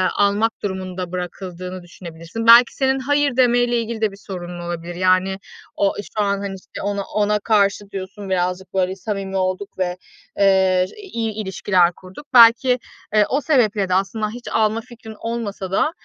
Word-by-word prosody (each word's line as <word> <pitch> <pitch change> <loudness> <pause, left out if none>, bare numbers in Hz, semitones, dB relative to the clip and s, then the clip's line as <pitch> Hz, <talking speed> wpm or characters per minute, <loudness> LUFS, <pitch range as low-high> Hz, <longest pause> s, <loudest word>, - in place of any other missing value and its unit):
almak 205 +3 +2
durumunda 185 -2 -4
bırakıldığını 180 0 -6
düşünebilirsin. 170 +5 -8
Belki, 235 +1 +8
senin 265 0 +1
hayır 290 0 +1
demeyle 245 -1 +3
ilgili 225 0 -5
de 215 -2 +1
bir 195 - -13
sorun 175 -2 -6
olabilir, 175 0 -5
yani. 185 +1 +2 0.4
O 200 -1 +1 0.2
şu 210 - +3
an, 200 0 0
hani, 195 -1 -4
işte - - -10
ona 200 0 -2
ona 210 +1 0
karşı 205 -1 +1
diyorsun, 195 +1 -7
birazcık 185 +1 -2
böyle 190 0 0
samimi 195 0 -4
olduk 185 +1 -2
ve, 180 -1 -1 0.4
eee, 190 -2 +4
ş - - -16
iyi 230 - -4
ilişkiler 190 -3 +1
kurduk. 190 +10 -13
Belki, 245 +1 +7 0.3
eee, 210 -1 +5
o 280 - +1
sebeple 220 -10 +2
de 180 - +1
aslında 210 +3 0
hiç 240 +2 -10
alma 220 +1 +1
fikrin 225 -2 -12
olmasa 215 -5 -4
da, 295 - +2
200 Hz, 165 wpm, -20 LUFS, 185-225 Hz, 0.4 s, Belki